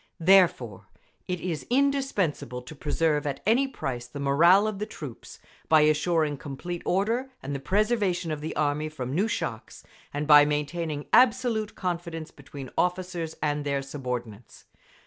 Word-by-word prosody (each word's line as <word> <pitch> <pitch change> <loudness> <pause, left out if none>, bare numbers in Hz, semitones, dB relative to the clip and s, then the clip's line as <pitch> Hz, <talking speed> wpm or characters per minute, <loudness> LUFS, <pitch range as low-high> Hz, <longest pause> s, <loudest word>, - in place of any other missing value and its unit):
Therefore 160 - +3 0.4
it 180 -1 -2
is 170 -4 -4
indispensable 245 - 0
to 140 - -10
preserve 150 0 0
at 140 -1 -3
any 245 +6 +3
price 130 - -5
the 145 +4 -8
morale 170 +9 +5
of 215 -2 -3
the 210 - -3
troops, 145 - -9 0.3
by 155 -1 +6
assuring 155 0 +2
complete 165 +6 -6
order 225 +8 0
and 140 +1 -4
the 140 - -3
preservation 190 - 0
of 150 -1 -4
the 155 - -5
Army 150 +1 0
from 130 -4 -5
new 195 +8 +1
shocks, 115 - -5 0.3
and 145 +1 -3
by 145 -1 +8
maintaining 150 +1 -2
absolute 235 -4 +3
confidence 170 -3 -4
between 140 -1 -10
officers 180 -2 -1
and 150 -1 0
their 140 -1 -1
subordinates. 125 -5 -6
155 Hz, 145 wpm, -26 LUFS, 140-185 Hz, 0.4 s, by